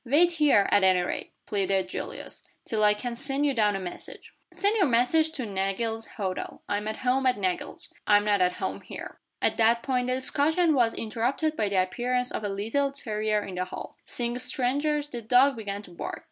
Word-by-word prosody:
"Wait 300 +8 +4
here, 295 -11 +4
at 205 - +4
any 185 -1 +5
rate," 180 - -4
pleaded 195 -2 0
Julius, - - -7 0.2
"till 215 -1 0
I 210 0 +5
can 240 +2 -4
send 275 +3 -1
you 285 - +2
down 210 -4 +2
a - - -2
message." 180 -2 -8 0.2
"Send 405 +2 +1
your 390 -7 +3
message 265 +7 +3
to 260 -6 -4
Nagle's 210 +3 -2
Hotel. 190 -3 -4
I'm 205 +1 -2
at 220 +4 -5
home 260 +1 +3
at 250 - +2
Nagle's 185 -3 -3
I'm 205 0 +5
not 205 -2 +2
at 180 0 +3
home - - -4
here." - - -9 0.2
At - - +2
that 230 +1 +3
point 250 -2 0
the 255 - +1
discussion 310 +6 +2
was 240 -5 +2
interrupted 245 +8 -1
by 210 -6 0
the 190 -2 +3
appearance 250 +6 -1
of - - -4
a 205 - -1
little 225 +8 0
terrier 215 -5 -1
in 195 - -7
the 180 0 -2
hall. - - -8
Seeing 240 0 -3
strangers, 285 +4 0
the 245 -5 -6
dog 250 +5 +4
began 205 -2 -5
to 180 - -14
bark. 170 - -5
230 Hz, 200 wpm, -27 LUFS, 205-270 Hz, 0.2 s, any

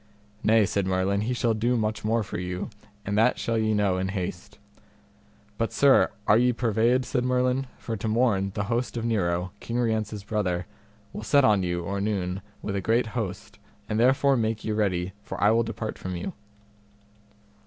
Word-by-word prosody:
Nay, 110 -1 +4
said 100 -1 -1
Merlin, 95 +2 +1
he 120 +4 -1
shall 120 -2 +1
do 120 +3 +1
much 110 -1 -1
more 110 +1 +1
for 95 - -5
you, 90 +2 -4 0.3
and 100 - -1
that 120 +3 +4
shall 115 - -1
ye 110 0 +1
know 100 -3 +1
in 95 - -1
haste. 95 -2 -5 1.0
But, 115 - 0
sir, 140 -1 +5 0.2
are 110 - +5
ye 125 0 +3
purveyed, 120 +2 +2
said 125 -1 -1
Merlin, 125 +1 +1
for 115 - -4
to 110 - -4
morn 110 -4 +2
the 105 - -1
host 120 +3 -2
of 115 - -2
Nero, 90 -5 0
King 120 - -4
Rience's 110 -3 -1
brother, 95 -5 -1 0.5
will - - -5
set 140 +5 +4
on 105 -4 +4
you 85 -1 -2
or 100 +3 -3
noon 95 -3 -2 0.2
with 100 - -3
a 100 - -1
great 115 +5 +2
host, 105 -6 -5 0.3
and 110 0 -1
therefore 135 +3 +4
make 110 -2 -1
you 110 - -1
ready, 95 -4 0
for - - -7
I 105 - +5
will 115 +1 +4
depart 110 -1 -4
from 95 -1 -4
you. 85 - -4
110 Hz, 185 wpm, -26 LUFS, 95-115 Hz, 1.0 s, sir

